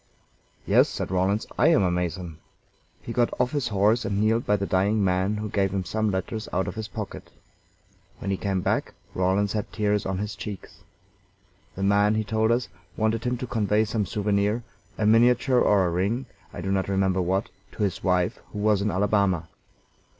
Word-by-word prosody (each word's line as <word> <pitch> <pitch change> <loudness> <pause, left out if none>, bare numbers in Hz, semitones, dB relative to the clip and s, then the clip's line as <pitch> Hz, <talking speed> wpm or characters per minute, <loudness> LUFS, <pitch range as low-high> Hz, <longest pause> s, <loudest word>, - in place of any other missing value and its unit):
"Yes," - - +4
said - - -4
Rawlins, 95 +4 +1
"I - - +5
am 160 -10 +4
a 90 - +2
Mason." 90 -2 -3 0.6
He 115 - -5
got 120 0 +2
off 125 0 +2
his 145 -5 -1
horse 105 +2 +2
and 100 0 -1
kneeled 110 +3 +1
by 105 - +4
the 100 -1 -2
dying 100 +3 +1
man, 95 +3 +1
who 105 +1 -3
gave 100 -1 +1
him 95 -1 -3
some 110 +4 0
letters 100 +3 -3
out 95 +1 0
of - - -3
his 110 0 -5
pocket. - - -7 0.9
When 100 - -4
he - - +1
came 95 -2 -1
back - - -1 0.2
Rawlins 95 +2 +1
had 105 -1 -3
tears 105 -2 0
on 95 -1 -2
his 105 +2 -4
cheeks. 100 -4 -8 1.0
The 95 - -4
man, 100 +2 +3
he 110 - 0
told 110 +1 0
us, 120 +1 +1 0.3
wanted 110 +1 0
him 125 0 0
to 125 - -4
convey 110 -2 +1
some 105 -2 -1
souvenir 105 +2 0 0.3
a 110 - 0
miniature 120 +3 +4
or 100 -3 +4
a - - +1
ring, 100 +9 -1 0.3
I - - -7
do 95 +2 -2
not 95 0 0
remember 95 -1 +1
what 95 +4 0 0.2
to 105 - -2
his 95 -4 -2
wife, 90 -1 +1
who - - -6
was 105 -1 +2
in 105 - 0
Alabama. 95 -3 +1
105 Hz, 195 wpm, -25 LUFS, 95-110 Hz, 1.0 s, I